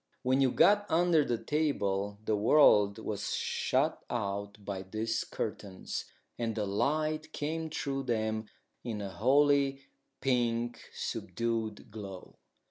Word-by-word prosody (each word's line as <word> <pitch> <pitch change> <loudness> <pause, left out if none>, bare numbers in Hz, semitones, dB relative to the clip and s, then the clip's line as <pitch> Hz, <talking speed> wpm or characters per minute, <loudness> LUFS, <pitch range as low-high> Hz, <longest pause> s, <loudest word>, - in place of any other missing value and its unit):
When 130 +2 +3
you 135 - +5
got 205 +9 +4
under 165 -2 +4
the 120 -4 0
table 105 -10 -1
the 110 - +2
world 105 -3 +5
was 105 -2 -3
shut - - 0
out 100 -3 -3
by 95 -2 -3
these 110 +4 -2
curtains, 95 -2 -5 0.3
and 115 -2 -1
the 105 -2 -1
light 155 +9 0
came 160 +2 -3
through 135 -2 -3
them 110 -2 -1 0.4
in 115 -3 -4
a 100 -2 -5
holy, 140 +6 +3 0.4
pink, 120 -2 0
subdued 110 +2 -3
glow. 100 -4 -9
115 Hz, 125 wpm, -31 LUFS, 105-140 Hz, 0.4 s, you